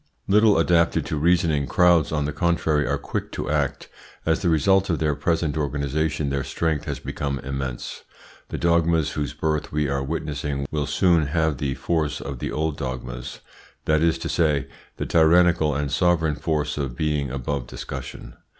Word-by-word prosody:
Little 105 +1 +5
adapted 85 0 +2
to - - -3
reasoning, 80 -2 +2
crowds, 85 +1 +4
on 75 -2 0
the 75 - -3
contrary, 80 -4 +1
are - - 0
quick - - -4
to 65 - -3
act. 75 -2 -1 0.4
As 80 +2 +1
the 90 - +1
result 95 +5 +3
of 85 - +1
their 75 -1 +1
present 75 +1 0
organisation 75 0 -1
their 70 -1 -1
strength 80 0 -1
has - - -3
become 70 -1 -3
immense. 65 -2 -5 0.5
The - - -4
dogmas 85 -2 +2
whose 75 -3 -3
birth 75 -1 -1
we 75 -1 0
are 70 0 0
witnessing 75 -1 -3
will 75 -2 -1
soon 80 0 +3
have 80 -2 0
the 70 -2 -1
force 80 -3 -1
of 70 -3 -6
the - - -3
old 80 -1 -1
dogmas; 65 -1 -6 0.4
that 75 0 +2
is 80 0 +3
to 80 - -5
say, 75 -5 +1 0.3
the - - -3
tyrannical 80 -2 +4
and 70 -1 -2
sovereign 80 0 +2
force 75 -1 -1
of 65 -4 -3
being 75 -3 0
above 65 0 -3
discussion. 65 +1 -8
75 Hz, 170 wpm, -24 LUFS, 70-80 Hz, 0.5 s, Little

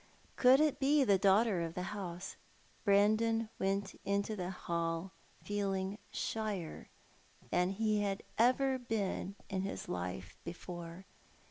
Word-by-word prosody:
Could 255 +1 +6
it 305 -2 +2
be 280 +1 +4
the 200 -6 +4
daughter 200 -1 +4
of 165 0 -3
the 180 - -2
house? 180 -3 -5 0.5
Brandon 215 +2 +3
went 195 +1 -1
into 200 +2 0
the 180 -3 -3
hall 170 0 -2 0.3
feeling 195 0 -1
shyer 210 -7 -3 0.6
than 180 +1 +3
he 210 +1 +1
had 195 -1 -1 0.2
ever 260 +2 +4
been 205 -4 -2
in 190 -2 -2
his 195 +1 -4
life 90 0 -4
before. 170 +1 -7
200 Hz, 125 wpm, -34 LUFS, 180-220 Hz, 0.6 s, Could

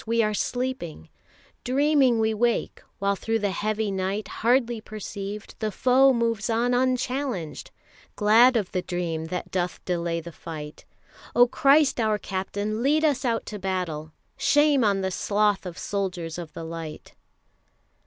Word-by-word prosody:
We 230 0 +2
are 215 0 0
sleeping, 245 - -3 0.5
Dreaming 275 -1 +3
we 220 0 +2
wake, 235 +2 0 0.2
while 200 0 +1
through 225 +3 -1
the 205 -2 -1
heavy 215 +1 -1
night 195 +2 -2
Hardly 240 -1 +1
perceived, 210 -1 -7
the 215 -1 -1
foe 260 +6 +4
moves 230 -2 0
on 235 +2 +1
unchallenged, 255 - -1 0.5
Glad 230 +4 +5
of 205 -5 -2
the 185 - -1
dream 170 -3 -3
that 180 +2 -5
doth 180 -1 -2
delay 170 -2 -1
the 170 +1 -9
fight. 155 -2 -9 0.5
O 245 - +8
Christ 275 +2 +4
our 215 -2 +2
Captain, 205 +3 -3
lead 300 +4 +3
us 285 -4 +1
out 235 -3 0
to 210 - -6
battle! 180 -5 -3 0.3
Shame 290 -3 +4
on 200 -2 +2
the 190 0 -1
sloth 205 0 +1
of 175 -1 -8
soldiers 180 -5 -3
of 170 -3 -8
the 165 - -7
light! 165 -1 -7
215 Hz, 150 wpm, -25 LUFS, 185-245 Hz, 0.5 s, O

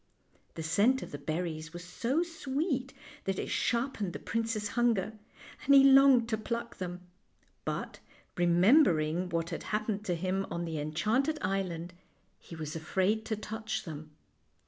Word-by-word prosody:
The 160 - -5
scent 210 +11 +3
of - - -9
the 145 - -6
berries 160 +2 -4
was 175 0 -7
so 245 - 0
sweet 285 -4 -2 0.3
that 195 -1 -1
it - - -3
sharpened 235 -6 0
the - - -5
prince's 225 -2 -2
hunger, 225 -3 +1 0.5
and 280 - +6
he 275 - +9
longed 270 -3 +7
to 220 -2 0
pluck 235 +2 -4
them; 180 -1 -5 0.6
but, - - -4 0.4
remembering 175 - +4
what 165 -1 -2
had - - -4
happened 210 -1 -1
to 175 - 0
him 185 +3 -1
on 170 0 -3
the 160 -2 -3
enchanted 215 - 0
island, 180 -3 -2 0.5
he 170 - -11
was 155 -1 -5
afraid 190 +7 0
to 220 - -1
touch 220 +1 -4
them. 155 -3 -8
195 Hz, 150 wpm, -31 LUFS, 170-235 Hz, 0.6 s, he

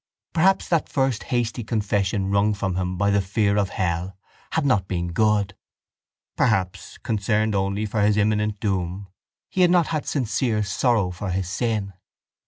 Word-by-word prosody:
Perhaps 190 +4 +3
that 170 -3 +1
first 135 -4 0
hasty 120 -1 -1
confession 100 -3 0
wrung 100 +1 +2
from 95 -2 -2
him 90 0 -2
by 100 +2 +2
the 100 0 +3
fear 100 +2 +1
of 100 -2 +1
hell 90 +1 -2 0.4
had 160 -3 +1
not 105 -9 +2
been 85 -2 -2
good? 105 -1 +2 0.8
Perhaps, 95 -6 0
concerned 110 0 0
only 100 +2 0
for 105 0 -1
his 105 0 +3
imminent 105 0 +1
doom, 95 -1 -2 0.4
he 185 - -1
had 180 - +6
not 175 -2 +3
had 155 -2 -2
sincere 120 -4 0
sorrow 105 -1 +1
for 95 +3 -5
his 90 0 -1
sin? 105 0 -2
105 Hz, 160 wpm, -23 LUFS, 95-115 Hz, 0.8 s, had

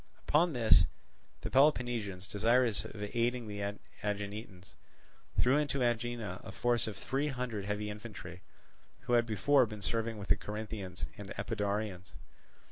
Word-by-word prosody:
Upon 165 +3 +4
this 110 -8 +6 0.6
the - - -4
Peloponnesians, 120 -9 +2
desirous 115 +3 +2
of 105 -1 -6
aiding 120 0 +1
the 100 0 -3 0.3
Aeginetans, 100 -2 -4 0.7
threw 130 +3 +5
into 140 -3 +1
Aegina 120 -5 -1
a - - -7
force 120 -2 +1
of 105 -3 -5
three 135 +8 -1
hundred 125 -7 -3
heavy 105 +1 -2
infantry, 105 -4 -8 0.6
who 120 - -2
had 120 -1 +4
before 125 +5 +4
been 105 -2 -7
serving 115 -1 0
with 100 -1 -7
the - - +5
Corinthians 105 -4 -5
and 100 -2 -7
Epidaurians. 100 -2 -2
110 Hz, 135 wpm, -33 LUFS, 100-120 Hz, 0.7 s, this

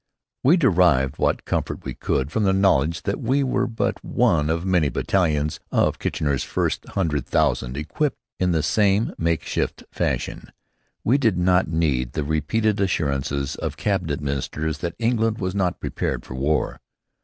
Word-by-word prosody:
We 155 +8 +6
derived 90 - +3
what - - +1
comfort - - -2
we - - -4
could 65 +3 -1
from 110 - 0
the 95 -2 +3
knowledge 85 -5 +2
that 100 - -2
we 135 +4 +2
were 130 - 0
but 115 -1 -2
one 75 -2 +2
of 85 +2 -1
many 90 -6 +2
battalions 75 -5 0
of - - +2
Kitchener's 70 -3 -1
first - - -1
hundred 80 -8 -1
thousand 65 -4 +1
equipped 140 - -1 0.2
in 90 -1 +2
this 80 -3 +1
same 105 0 +2
makeshift 85 -1 -1
fashion. - - -2 0.5
We 130 +6 +3
did 110 -9 +2
not 90 +1 +3
need 70 -7 0
the 75 - -1
repeated 95 +8 0
assurances 70 -6 -1
of - - -4
cabinet 90 -8 -1
ministers 75 +2 -2
that 85 0 -3
England 115 -1 +1
was 95 -1 -2
not 95 -3 0
prepared 60 -3 -3
for - - -8
war. 70 +4 0
85 Hz, 155 wpm, -23 LUFS, 75-100 Hz, 0.5 s, We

